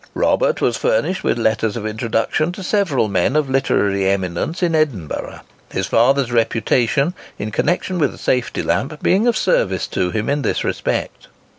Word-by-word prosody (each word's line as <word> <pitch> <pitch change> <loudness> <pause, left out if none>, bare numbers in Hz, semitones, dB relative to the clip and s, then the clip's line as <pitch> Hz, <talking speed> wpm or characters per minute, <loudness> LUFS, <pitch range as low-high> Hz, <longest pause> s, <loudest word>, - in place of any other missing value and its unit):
Robert - - +1
was - - +1
furnished 485 - 0
with - - +1
letters 110 0 0
of 110 - -5
introduction 115 +8 -1
to 195 - -8
several 175 - +1
men 100 +6 +1
of 150 -3 +1
literary 100 -7 +1
eminence 95 - -2
in 170 -2 +2
Edinburgh; 135 - -2 0.3
his 95 - -2
father's 125 +5 +2
reputation 120 - +1 0.2
in 105 +1 -4
connexion 180 - 0
with 155 - +2
the - - -13
safety 125 -1 -1
lamp 150 +2 -2
being 205 +6 +3
of 235 -2 +2
service 95 - +1
to 90 - -1
him 110 +3 -2
in 145 +1 0
this 115 - -1
respect. - - -3
125 Hz, 165 wpm, -19 LUFS, 110-160 Hz, 0.3 s, being